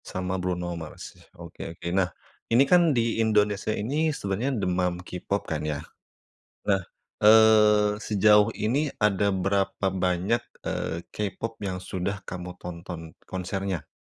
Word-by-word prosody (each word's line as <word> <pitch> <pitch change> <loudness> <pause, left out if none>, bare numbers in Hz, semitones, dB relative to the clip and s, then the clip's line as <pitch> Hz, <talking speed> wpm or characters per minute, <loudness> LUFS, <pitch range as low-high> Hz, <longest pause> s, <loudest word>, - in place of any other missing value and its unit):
Sama 95 0 -3
Bruno 90 -1 -2
Mars, 80 - -9 0.2
oke, - - -11 0.2
oke. - - -7
Nah 95 -1 +2 0.4
ini 120 +4 +6
kan 180 +4 +5 0.2
di 115 -1 +1
Indonesia 105 -2 +2
ini 140 +10 0
sebenarnya 125 0 -2
demam 90 -1 0
K-Pop 95 +3 -3
kan 80 -2 -3
ya, 75 -1 -2 0.9
nah, 100 -1 +2 0.4
eee, 105 -1 +6
sejauh 105 0 +4
ini 140 +8 +1
ada 105 -2 +2
berapa 95 +1 0
banyak, 95 +4 +1 0.2
eee, 85 +1 -3
K-Pop 110 +2 -4
yang 95 -3 -3
sudah 95 +2 -3
kamu 90 0 -7
tonton 85 -2 -8 0.2
konsernya? 95 -1 -3
100 Hz, 130 wpm, -26 LUFS, 90-105 Hz, 0.9 s, ini